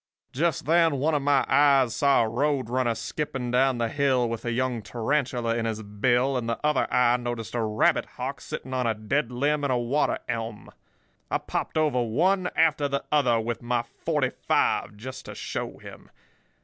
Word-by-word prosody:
"Just 160 0 0
then 165 0 +4
one 155 +4 +1
of 145 - +1
my 140 -1 +3
eyes 135 -3 +4
saw 140 -4 +4
a - - -2
roadrunner 130 -1 0
skipping 125 +1 -4
down 130 0 +3
the 115 -1 0
hill 130 -1 +1
with 115 0 -4
a 120 - -1
young 125 -1 -1
tarantula 120 +2 -1
in 115 -1 -1
his 110 -1 -3
bill, 120 +6 +1
and 115 -2 -3
the 115 - -1
other 150 -3 +2
eye 125 0 +4
noticed 120 -2 -5
a 120 - 0
rabbit 110 -1 +2
hawk - - -4
sitting 130 - -6
on 125 -2 0
a 110 - 0
dead 115 +5 -1
limb 145 +4 0
in 140 - 0
a 125 - +2
water 125 +5 0
elm. 115 -2 -5 0.6
I - - +1
popped - - -4
over 150 -5 +2
one 180 - +1
after 155 -3 +3
the 140 0 -2
other 135 -6 +3
with 115 +1 -3
my 120 0 -1
forty - - -2 0.2
five, 105 - +1
just 130 +4 -8
to - - -8
show - - -5
him. - - -13
125 Hz, 190 wpm, -26 LUFS, 115-145 Hz, 0.6 s, then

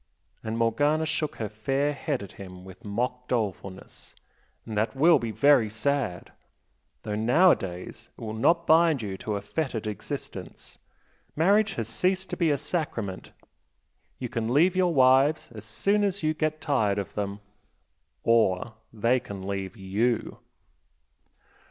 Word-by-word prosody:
and 110 +1 -3
Morgana 145 +7 +2
shook 155 -1 -2
her 110 - -3
fair 135 +8 -1
head 140 -4 -3
at 100 - -10
him 90 -2 -11
with 95 -1 -13
mock 125 +4 -3
dolefulness 100 -5 -4 0.5
"And 110 - -6
that 110 +5 0
will 165 +5 +5
be 115 - -3
very 130 -1 +4
sad! 110 -4 -2 0.7
Though 105 - -4
nowadays 110 - +1
it - - -16
will 110 -1 -5
not 170 +10 +2
bind 160 -5 +4
you 100 -2 -4
to 105 - -3
a 100 - -4
fettered 130 -5 -3
existence. 105 -2 -7 0.6
Marriage 200 +6 +3
has 115 -2 -3
ceased 185 +11 -1
to - - -1
be 170 -3 +2
a 145 - +2
sacrament, 115 - -4 0.9
you 125 - -4
can 115 0 -2
leave 170 +8 +4
your 185 -2 +3
wives 135 +2 +4
as 105 -1 -9
soon 200 - +1
as 200 -2 -1
you 155 0 +2
get 155 0 -2
tired 110 -9 +1
of 100 - -4
them, 100 0 -3 0.8
or 115 -2 +2 0.2
they 115 +3 +2
can 100 -6 -8
leave 100 0 -4
YOU!" 105 +5 -1
120 Hz, 145 wpm, -27 LUFS, 105-155 Hz, 0.9 s, will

